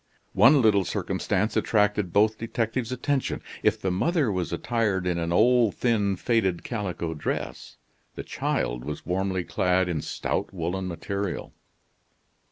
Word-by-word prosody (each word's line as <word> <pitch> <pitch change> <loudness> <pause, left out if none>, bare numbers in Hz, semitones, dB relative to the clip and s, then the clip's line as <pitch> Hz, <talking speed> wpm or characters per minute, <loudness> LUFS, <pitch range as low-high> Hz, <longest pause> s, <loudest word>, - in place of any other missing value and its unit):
One 140 -2 +6
little 100 -3 +4
circumstance 100 +3 -1
attracted 105 -3 +1
both 110 +3 +3
detectives' 115 +1 -2
attention. 135 +2 -1 0.2
If - - +2
the 95 - -1
mother 145 - +1
was 90 -4 -2
attired 105 -6 0
in 90 -1 0
an 85 0 -2
old, 115 +3 +4
thin, 105 -5 +1
faded 95 -4 0
calico 95 -7 -3
dress, 75 - -4 0.4
the - - -5
child - - -2
was 75 +1 -6
warmly 95 0 -1
clad 90 +1 +1
in 80 -4 -1
stout - - -3
woolen 90 +1 -3
material. 100 +2 -4
100 Hz, 135 wpm, -26 LUFS, 90-115 Hz, 0.4 s, One